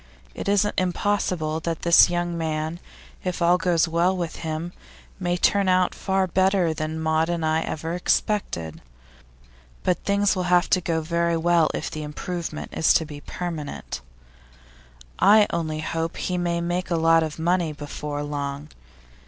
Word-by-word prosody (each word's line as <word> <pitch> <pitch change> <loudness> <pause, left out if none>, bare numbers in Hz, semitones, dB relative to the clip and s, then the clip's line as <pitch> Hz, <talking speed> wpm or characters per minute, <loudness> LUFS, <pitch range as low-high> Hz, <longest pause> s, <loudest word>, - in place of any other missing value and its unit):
It - - -4
isn't 205 +1 +2
impossible 180 -4 0
that 165 0 -4
this 170 0 +7
young 175 0 -1
man, 160 0 -2 0.4
if 180 -1 -3
all 175 +1 +4
goes 170 -1 +2
well 170 +3 +1
with 170 -2 -4
him, 160 +2 -4 0.5
may 175 -1 0
turn 200 +2 +2
out 185 0 +3
far 190 -1 0
better 185 -2 +2
than 155 +1 -4
Maud 160 +1 +1
and 170 -2 -1
I 155 +1 +2
ever 160 +1 -4
expected. 175 - -1 1.0
But 180 - +1
things 200 0 +2
will 185 - -1
have 180 0 +3
to 185 - +4
go 165 -2 -1
very 170 +1 0
well, 170 -1 +3
if - - -4
the 155 - -5
improvement 160 +2 -5
is 160 - +4
to 160 - +2
be 145 -1 -9
permanent. 160 - -5 1.2
I 210 +1 +7
only 155 -2 -2
hope 165 +1 -3
he 180 - -2
may 175 -1 -1
make 175 +2 -2
a 170 - +1
lot 165 0 +4
of 155 -2 -3
money 170 0 +1
before 145 0 -5
long. 145 0 -4
170 Hz, 160 wpm, -24 LUFS, 155-180 Hz, 1.2 s, this